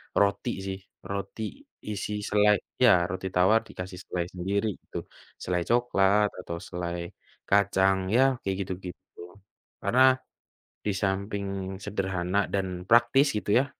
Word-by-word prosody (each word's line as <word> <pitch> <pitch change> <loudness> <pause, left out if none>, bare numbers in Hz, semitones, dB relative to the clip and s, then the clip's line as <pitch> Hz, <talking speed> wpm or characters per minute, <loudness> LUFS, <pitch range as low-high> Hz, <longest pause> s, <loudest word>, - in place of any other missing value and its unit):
roti 100 -1 +2
sih, 95 0 -4 0.2
roti 100 +2 -5 0.5
isi 105 +1 -4
selai 105 0 +4 0.2
iya, 125 -3 +7 0.2
roti 95 +1 -3
tawar 95 +5 +5
dikasih 90 -2 -7
selai 90 -1 -2
sendiri, 100 +4 -1
itu. - - -9 0.5
Selai 90 -1 0
coklat, 105 -4 +3
atau 85 -2 -5
selai 85 -1 -4 0.4
kacang, 95 -1 +3
ya, 130 - +6 0.2
kayak 95 -1 -1
gitu-gitu. 90 -1 -9 0.6
Karena 125 +2 +3 0.8
disamping 100 0 -1 0.4
sederhana, 95 -2 -1
dan 95 -1 +1 0.2
praktis 120 +5 +5
gitu 105 - -5
ya, 135 - +2
100 Hz, 115 wpm, -27 LUFS, 95-105 Hz, 0.8 s, iya